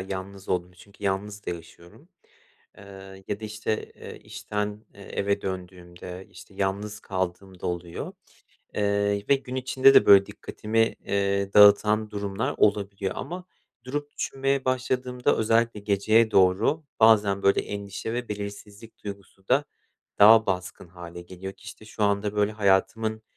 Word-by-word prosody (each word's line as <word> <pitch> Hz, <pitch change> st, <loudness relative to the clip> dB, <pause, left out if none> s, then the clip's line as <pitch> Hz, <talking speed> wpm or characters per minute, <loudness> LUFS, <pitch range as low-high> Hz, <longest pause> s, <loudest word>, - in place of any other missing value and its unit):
yalnız 95 Hz, +1 st, -7 dB
olduğum 90 Hz, 0 st, -1 dB
çünkü 100 Hz, +3 st, -15 dB
yalnız 100 Hz, +1 st, -3 dB
da -, -, -1 dB
yaşıyorum. 85 Hz, -, -11 dB, 0.7 s
Eee, 95 Hz, -1 st, -12 dB
ya 105 Hz, -, -3 dB
da, -, -, -6 dB
işte, 110 Hz, 0 st, -4 dB
eee, -, -, -10 dB
işten, 105 Hz, +1 st, -5 dB
eee, 100 Hz, -, -13 dB
eve 100 Hz, +1 st, -2 dB
döndüğümde, 90 Hz, 0 st, -7 dB
işte, 100 Hz, -, -15 dB
yalnız 100 Hz, +2 st, -3 dB
kaldığımda 95 Hz, -1 st, -4 dB
oluyor. 85 Hz, -1 st, -5 dB, 0.6 s
Eee, 100 Hz, 0 st, 0 dB
ve 140 Hz, -, +6 dB
gün 130 Hz, -1 st, -8 dB
içinde 130 Hz, +1 st, +4 dB
de, -, -, +7 dB
böyle, 100 Hz, -1 st, +8 dB
dikkatimi, 115 Hz, +1 st, -1 dB
eee, 100 Hz, 0 st, 0 dB
dağıtan 105 Hz, +1 st, +6 dB
durumlar 100 Hz, +1 st, -3 dB
olabiliyor 100 Hz, -2 st, +1 dB
ama 180 Hz, +5 st, -6 dB, 0.4 s
durup 145 Hz, +3 st, -5 dB
düşünmeye 135 Hz, 0 st, -1 dB
başladığımda 125 Hz, -1 st, 0 dB
özellikle 115 Hz, 0 st, +1 dB
geceye 110 Hz, +3 st, +3 dB
doğru 100 Hz, -, +3 dB, 0.2 s
bazen, 105 Hz, -3 st, +5 dB
böyle, 100 Hz, -, +4 dB
endişe 100 Hz, +2 st, -6 dB
ve 125 Hz, 0 st, -4 dB
belirsizlik 105 Hz, +2 st, -8 dB
duygusu 100 Hz, -1 st, -10 dB
da 135 Hz, +4 st, +3 dB, 0.5 s
daha 110 Hz, +2 st, +8 dB
baskın 90 Hz, -1 st, -4 dB
hâle 85 Hz, 0 st, -10 dB
geliyor 95 Hz, +2 st, -8 dB
ki, -, -, -22 dB
işte, 110 Hz, -, -11 dB
şu 110 Hz, 0 st, -6 dB
anda, 100 Hz, +1 st, 0 dB
böyle, 105 Hz, 0 st, +2 dB
hayatımın 110 Hz, +2 st, +1 dB
100 Hz, 140 wpm, -26 LUFS, 95-110 Hz, 0.7 s, böyle